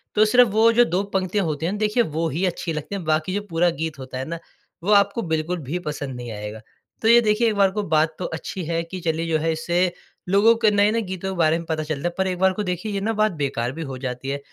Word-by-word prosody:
तो 215 Hz, -, +5 dB
सिर्फ़ 245 Hz, +1 st, +5 dB
वो 220 Hz, +3 st, +4 dB
जो 240 Hz, +1 st, +5 dB
दो 180 Hz, +4 st, 0 dB
पंक्तियाँ 190 Hz, 0 st, 0 dB
होते 155 Hz, 0 st, -2 dB
हैं 185 Hz, -, 0 dB
ना, -, -, -3 dB
देखिए 215 Hz, +3 st, +2 dB
वो 165 Hz, -3 st, -2 dB
ही 170 Hz, +7 st, -1 dB
अच्छी 170 Hz, -2 st, -2 dB
लगती 155 Hz, +6 st, -5 dB
हैं। 190 Hz, -, -4 dB
बाकी 155 Hz, +3 st, 0 dB
जो 205 Hz, -, -1 dB
पूरा 170 Hz, +1 st, +2 dB
गीत 160 Hz, -2 st, -4 dB
होता 130 Hz, -1 st, -7 dB
है 130 Hz, -, -3 dB
ना 165 Hz, +2 st, -5 dB, 0.4 s
वो 205 Hz, -, 0 dB
आपको 200 Hz, +3 st, +3 dB
बिल्कुल 165 Hz, +1 st, -1 dB
भी 160 Hz, +7 st, -3 dB
पसंद 140 Hz, -3 st, -4 dB
नहीं 120 Hz, -1 st, -7 dB
आएगा। 105 Hz, +1 st, -7 dB, 0.4 s
तो 220 Hz, -, +1 dB
ये 235 Hz, +1 st, +8 dB
देखिए 220 Hz, +1 st, +2 dB
एक 215 Hz, -, +1 dB
बार 195 Hz, -1 st, +4 dB
को 210 Hz, +1 st, -2 dB
बात 155 Hz, -2 st, +1 dB
तो 180 Hz, -, -3 dB
अच्छी 190 Hz, -, -5 dB
है 165 Hz, +1 st, -1 dB
कि 185 Hz, +2 st, -7 dB
चलिए 165 Hz, 0 st, -1 dB
जो 160 Hz, -1 st, +2 dB
है 165 Hz, +1 st, 0 dB
इससे 175 Hz, +3 st, 0 dB, 0.4 s
लोगों 215 Hz, +4 st, +5 dB
के 215 Hz, -, +7 dB
नए-नए 210 Hz, +3 st, +3 dB
गीतों 190 Hz, -1 st, -5 dB
के -, -, -8 dB
बारे 160 Hz, 0 st, +3 dB
में 170 Hz, -, -7 dB
पता 155 Hz, -1 st, -1 dB
चलता 155 Hz, +1 st, -3 dB
है। 175 Hz, -, -3 dB
पर 190 Hz, -, +1 dB
एक 185 Hz, -1 st, -2 dB
बार 190 Hz, 0 st, +4 dB
को 210 Hz, -, -3 dB
देखिए 180 Hz, +3 st, -3 dB
ये 200 Hz, -, -1 dB
ना 225 Hz, +3 st, 0 dB
बात 215 Hz, -1 st, +2 dB
बेकार 125 Hz, -3 st, -1 dB
भी 165 Hz, +4 st, -7 dB
हो 130 Hz, -, -5 dB
जाती 130 Hz, +1 st, -5 dB
है। 140 Hz, -, -2 dB
175 Hz, 275 wpm, -23 LUFS, 155-205 Hz, 0.4 s, ये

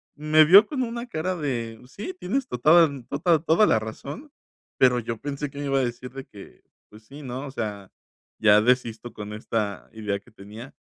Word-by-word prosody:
me 155 Hz, +1 st, +4 dB
vio 195 Hz, +7 st, +8 dB
con 265 Hz, -4 st, -2 dB
una 235 Hz, 0 st, -5 dB
cara 185 Hz, -4 st, -3 dB
de 120 Hz, -8 st, -4 dB
sí, 210 Hz, -, -7 dB
tienes 260 Hz, +8 st, -2 dB
tota 125 Hz, -, +1 dB, 0.2 s
da -, -, -7 dB, 0.2 s
tota 160 Hz, +3 st, +2 dB
toda 165 Hz, +6 st, +3 dB
la -, -, +3 dB
razón. 140 Hz, -, -8 dB, 0.5 s
Pero 125 Hz, -1 st, +4 dB
yo 115 Hz, 0 st, -4 dB
pensé 145 Hz, +2 st, -4 dB
que 140 Hz, -, -14 dB
me 145 Hz, -, -4 dB
iba 135 Hz, -1 st, +1 dB
a -, -, +1 dB
decir 125 Hz, +1 st, -5 dB
de 135 Hz, +1 st, -8 dB
que, 100 Hz, -, -15 dB, 0.3 s
pues, 105 Hz, +1 st, -16 dB
sí, 140 Hz, +6 st, -12 dB
¿no? 130 Hz, +1 st, -6 dB
O -, -, -8 dB
sea, 105 Hz, -6 st, -5 dB, 0.5 s
ya 105 Hz, -1 st, +6 dB
desisto 120 Hz, 0 st, 0 dB
con 105 Hz, 0 st, -8 dB
esta 105 Hz, -2 st, -3 dB
idea 105 Hz, -3 st, -3 dB
que 100 Hz, -, -22 dB
tenía. 110 Hz, +5 st, -12 dB
130 Hz, 200 wpm, -24 LUFS, 110-155 Hz, 0.5 s, vio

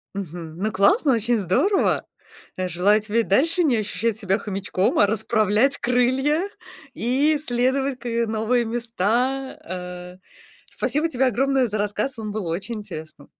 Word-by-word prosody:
Мгм. 170 Hz, -4 st, -6 dB
Ну, 215 Hz, +3 st, -1 dB
классно, 265 Hz, -, +3 dB
очень 230 Hz, +1 st, +1 dB
здорово. 365 Hz, -, +1 dB, 0.5 s
Э, 185 Hz, 0 st, -2 dB
желаю 195 Hz, +5 st, +3 dB
тебе 215 Hz, +2 st, 0 dB
и -, -, +3 dB
дальше 330 Hz, -, +3 dB
не 255 Hz, -6 st, +3 dB
ощущать 215 Hz, +1 st, -1 dB
себя 200 Hz, -2 st, 0 dB
хомячком, 195 Hz, -2 st, -1 dB
а 205 Hz, -, +6 dB
расправлять 220 Hz, +4 st, +1 dB
крылья 260 Hz, +8 st, +1 dB, 0.5 s
и 275 Hz, +6 st, +1 dB
исследовать 265 Hz, 0 st, 0 dB
к, 245 Hz, -, -11 dB
э, 235 Hz, 0 st, 0 dB
новые 225 Hz, +2 st, 0 dB
места, 240 Hz, +3 st, -1 dB
э. 180 Hz, 0 st, -7 dB, 0.5 s
Спасибо 305 Hz, +3 st, 0 dB
тебе 265 Hz, -3 st, +1 dB
огромное 265 Hz, +2 st, +2 dB
за 215 Hz, -1 st, -3 dB
рассказ, 210 Hz, +5 st, -2 dB
он 215 Hz, -1 st, -5 dB
был 205 Hz, -4 st, -4 dB
очень 195 Hz, +8 st, -3 dB
интересным. 160 Hz, -8 st, -9 dB
225 Hz, 150 wpm, -23 LUFS, 200-260 Hz, 0.5 s, а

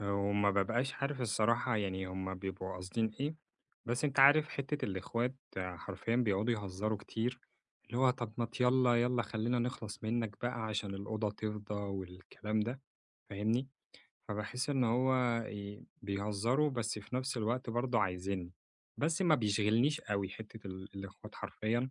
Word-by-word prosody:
وما 100 Hz, 0 st, +2 dB
بابقاش 115 Hz, +7 st, +1 dB
عارف 140 Hz, -1 st, -2 dB
الصراحة 115 Hz, +1 st, +2 dB
يعني 95 Hz, -2 st, -1 dB
هُم 95 Hz, 0 st, -3 dB
بيبقوا 95 Hz, 0 st, -4 dB
قاصدين 100 Hz, +5 st, -1 dB
إيه، 145 Hz, +3 st, 0 dB, 0.5 s
بس 120 Hz, +4 st, 0 dB
أنتَ 140 Hz, -2 st, 0 dB
عارف 145 Hz, +3 st, +8 dB
حتّة 140 Hz, +2 st, -2 dB
الأخوات 115 Hz, +6 st, -1 dB, 0.2 s
حرفيًا 95 Hz, +4 st, -2 dB
بيقعدوا 115 Hz, -1 st, +2 dB
يهزروا 105 Hz, +1 st, -2 dB
كتير، 115 Hz, +5 st, -2 dB, 0.5 s
اللي 120 Hz, +2 st, -3 dB
هو 130 Hz, -1 st, +6 dB
طَب 120 Hz, -4 st, -4 dB
ما 120 Hz, -, +1 dB
تيلّا، 125 Hz, +1 st, +4 dB
يلّا 120 Hz, +1 st, +3 dB
خلّينا 110 Hz, +3 st, 0 dB
نخلص 120 Hz, -3 st, -3 dB
منك 115 Hz, -2 st, -1 dB
بقى 120 Hz, -1 st, -1 dB
عشان 105 Hz, -2 st, -2 dB
الأوضة 105 Hz, +2 st, -2 dB
تفضى 105 Hz, 0 st, -4 dB
والكلام 100 Hz, +2 st, -3 dB
ده، 120 Hz, +5 st, -2 dB, 0.5 s
فاهمني؟ 110 Hz, +6 st, +1 dB, 0.6 s
فباحس 110 Hz, +7 st, -2 dB
إن 135 Hz, -3 st, +3 dB
هو 125 Hz, 0 st, +3 dB
ي 100 Hz, 0 st, -7 dB, 0.2 s
بيهزروا 105 Hz, +8 st, +1 dB
بس 115 Hz, -4 st, -1 dB
في 105 Hz, +5 st, -5 dB
نفْس 130 Hz, 0 st, -1 dB
الوقت 115 Hz, +2 st, 0 dB
برضه 120 Hz, 0 st, +2 dB
عايزينّي، 90 Hz, -1 st, -1 dB, 0.4 s
بس 160 Hz, +5 st, +1 dB
ما 170 Hz, -4 st, +6 dB
بيشغلنيش 115 Hz, +6 st, +3 dB
أوي 100 Hz, -2 st, -1 dB
حتّة 110 Hz, +2 st, -9 dB
ال 95 Hz, +1 st, -7 dB
الأخوات 100 Hz, 0 st, -8 dB
حرفيًا 120 Hz, +4 st, -1 dB
110 Hz, 145 wpm, -35 LUFS, 100-125 Hz, 0.6 s, عارف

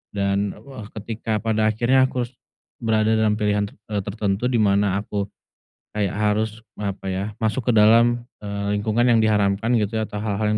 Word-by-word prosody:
Dan 100 Hz, 0 st, 0 dB
wah, 130 Hz, -7 st, -10 dB
Ketika 110 Hz, 0 st, -4 dB
pada 110 Hz, -1 st, +2 dB
akhirnya 125 Hz, +4 st, +3 dB
aku 125 Hz, -1 st, -2 dB
harus 120 Hz, -, -8 dB, 0.5 s
berada 110 Hz, -1 st, +2 dB
dalam 110 Hz, -1 st, +2 dB
pilihan 105 Hz, -1 st, 0 dB
ter -, -, -16 dB, 0.2 s
eee, 105 Hz, -, 0 dB
tertentu 100 Hz, +2 st, -1 dB
dimana 100 Hz, -4 st, +2 dB
aku 100 Hz, -1 st, -3 dB, 0.7 s
kayak 105 Hz, -3 st, 0 dB
harus, 105 Hz, +2 st, -1 dB, 0.2 s
apa 100 Hz, -1 st, -4 dB
ya, 95 Hz, +1 st, -2 dB
masuk 115 Hz, +2 st, -1 dB
ke -, -, +4 dB
dalam, 115 Hz, +3 st, +5 dB, 0.2 s
eee, 100 Hz, 0 st, -2 dB
lingkungan 115 Hz, +3 st, +1 dB
yang 120 Hz, -2 st, +4 dB
diharamkan 105 Hz, +2 st, +2 dB
gitu 105 Hz, 0 st, -1 dB
ya, 110 Hz, -1 st, -1 dB
atau 105 Hz, -, -5 dB
hal-hal 105 Hz, 0 st, 0 dB
105 Hz, 170 wpm, -22 LUFS, 100-115 Hz, 0.7 s, dalam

